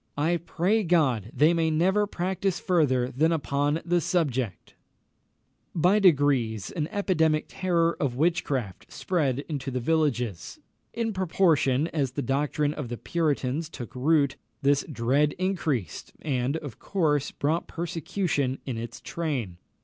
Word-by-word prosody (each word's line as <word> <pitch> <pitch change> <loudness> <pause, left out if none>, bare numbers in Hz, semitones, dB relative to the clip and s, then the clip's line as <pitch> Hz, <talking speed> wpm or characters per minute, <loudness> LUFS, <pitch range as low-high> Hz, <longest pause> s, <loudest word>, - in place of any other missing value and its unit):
I 165 +4 +2
pray 180 +6 0
God 135 - +2
they 155 +3 +4
may 165 -1 +1
never 190 +6 +2
practise 185 0 -2
further 130 -8 +1
than 155 +6 +2
upon 145 0 0
the 175 0 +2
subject!" 130 - -1
[Illustration: - - -45
JEWELL.] 165 - -1
By 195 +4 +5
degrees, 135 - +2
an 155 -3 -2
epidemic 160 -6 +1
terror 170 -3 +1
of 130 -4 -1
witchcraft 140 - -1
spread 145 -7 -1
into 145 -4 -4
the 130 -1 -2
villages. 125 - -1 0.3
In 230 -1 -2
proportion 165 -6 +2
as 140 -5 -1
the 140 - -2
doctrine 145 +2 0
of 145 -6 -5
the 120 - -4
Puritans 155 -1 -1
took 125 -7 -9
root, 140 +1 +2 0.3
this 140 0 +3
dread 140 +4 +2
increased, 160 - -2
and, 135 0 0
of 145 -8 -8
course, 150 -7 0
brought 160 +4 -1
persecution 165 -4 -2
in 125 -4 -3
its 120 +1 -7
train. 135 - -3
150 Hz, 140 wpm, -26 LUFS, 130-170 Hz, 0.3 s, By